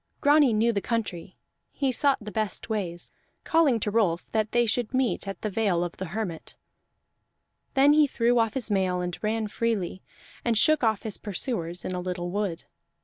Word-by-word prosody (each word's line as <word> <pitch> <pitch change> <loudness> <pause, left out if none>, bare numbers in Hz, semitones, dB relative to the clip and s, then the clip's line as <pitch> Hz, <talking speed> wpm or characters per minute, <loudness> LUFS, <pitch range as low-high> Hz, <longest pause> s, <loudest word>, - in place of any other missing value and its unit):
Grani 290 -2 +5
knew 225 +2 +2
the 200 - -1
country; 195 -7 -3 0.3
he 275 -2 0
sought 275 +2 +3
the 210 -1 -8
best 215 +1 -3
ways, 175 -5 -3 0.3
calling 310 -8 +3
to 210 - -1
Rolf 195 -6 0
that 215 -1 0
they 240 0 +3
should 235 +2 -1
meet 255 -5 0
at 195 - -5
the 215 - 0
Vale 195 -5 +1
of 175 - -5
the 190 - -4
Hermit. 180 -2 -5 1.2
Then 280 +2 +6
he 300 -1 +5
threw 240 -2 +2
off 225 -2 +1
his 245 -5 -2
mail 185 -2 +1
and 180 -1 -3
ran 220 +1 0
freely, 205 -5 -2 0.4
and 235 -2 +1
shook 310 +4 +4
off 220 -3 +1
his 215 -3 -4
pursuers 185 -4 -3
in 185 - -3
a 180 - -2
little 175 -1 -4
wood. 200 -4 -2
215 Hz, 185 wpm, -26 LUFS, 185-235 Hz, 1.2 s, Then